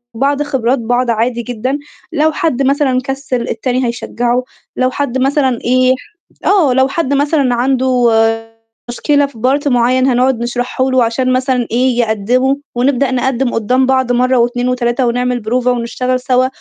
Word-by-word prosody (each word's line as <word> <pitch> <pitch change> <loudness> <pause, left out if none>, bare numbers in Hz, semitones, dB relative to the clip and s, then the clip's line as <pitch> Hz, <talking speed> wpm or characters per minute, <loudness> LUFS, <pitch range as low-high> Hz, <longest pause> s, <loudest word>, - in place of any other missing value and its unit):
بعض 280 +4 0
خبرات 265 -3 0
بعض 245 +1 0
عادي 235 +2 -1
جدًا، 250 +4 -3 0.4
لو 310 +2 +2
حد 315 -6 -1
مثلًا 270 -2 +1
كسِّل 270 -2 -3
التاني 255 +2 -1
هيشجّعه، 240 +1 -1 0.3
لو 255 0 +1
حد 265 -2 -2
مثلًا 265 -2 +1
إيه 255 +1 +3 0.5
آه، 340 -11 +3
لو 265 +1 +3
حد 285 -1 -2
مثلًا 280 -3 +1
عنده 255 -1 +2 0.8
مشكلة 285 +3 +1
في 275 - -16
part 275 +4 +1
معيّن 255 +1 +2
هنقعد 250 -1 +2
نشرحه 245 +2 -2
له 255 -2 +3
عشان 255 +3 0
مثلًا 255 -2 0
إيه، 245 0 +1
يقدّموا 240 +5 +1 0.2
ونبدأ 265 +1 +1
نقدم 255 0 0
قُدّام 250 +4 +1
بعض 260 -1 +1
مرّة 250 +1 +2
و2 245 +1 +1
و3 245 0 0
ونعمل 245 +1 0
بروفة 245 +3 0
ونشتغل 250 +1 -2
سَوا 255 0 +1
255 Hz, 150 wpm, -14 LUFS, 245-265 Hz, 0.8 s, إيه